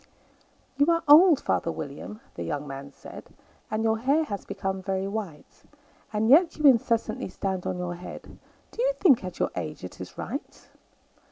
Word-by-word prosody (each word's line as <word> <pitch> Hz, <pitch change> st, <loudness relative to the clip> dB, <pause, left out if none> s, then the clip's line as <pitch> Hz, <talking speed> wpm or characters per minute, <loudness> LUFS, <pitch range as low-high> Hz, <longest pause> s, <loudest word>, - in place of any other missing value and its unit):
"YOU 285 Hz, +1 st, +4 dB
are 335 Hz, 0 st, +2 dB
old, 310 Hz, +1 st, +8 dB
father 165 Hz, -, -1 dB
William," 155 Hz, +10 st, -7 dB
the -, -, -8 dB
young 145 Hz, -2 st, -3 dB
man 135 Hz, 0 st, -8 dB
said, -, -, -12 dB, 0.4 s
"And 215 Hz, +1 st, -1 dB
your 220 Hz, 0 st, +1 dB
hair 280 Hz, +7 st, +2 dB
has 200 Hz, -9 st, -5 dB
become 190 Hz, 0 st, -3 dB
very 190 Hz, 0 st, -2 dB
white; 195 Hz, -8 st, -7 dB, 0.5 s
And 215 Hz, 0 st, 0 dB
yet 320 Hz, +7 st, +5 dB
you 305 Hz, -, -1 dB
incessantly 230 Hz, -6 st, +3 dB
stand 190 Hz, 0 st, -3 dB
on -, -, -2 dB
your 180 Hz, -1 st, -3 dB
head 175 Hz, +1 st, -10 dB, 0.3 s
Do -, -, -4 dB
you -, -, +2 dB
think, 290 Hz, -, +4 dB
at 185 Hz, -1 st, -6 dB
your -, -, 0 dB
age, 155 Hz, -8 st, -5 dB
it 90 Hz, -, -9 dB
is -, -, -9 dB
right? -, -, -7 dB
210 Hz, 175 wpm, -26 LUFS, 180-280 Hz, 0.5 s, old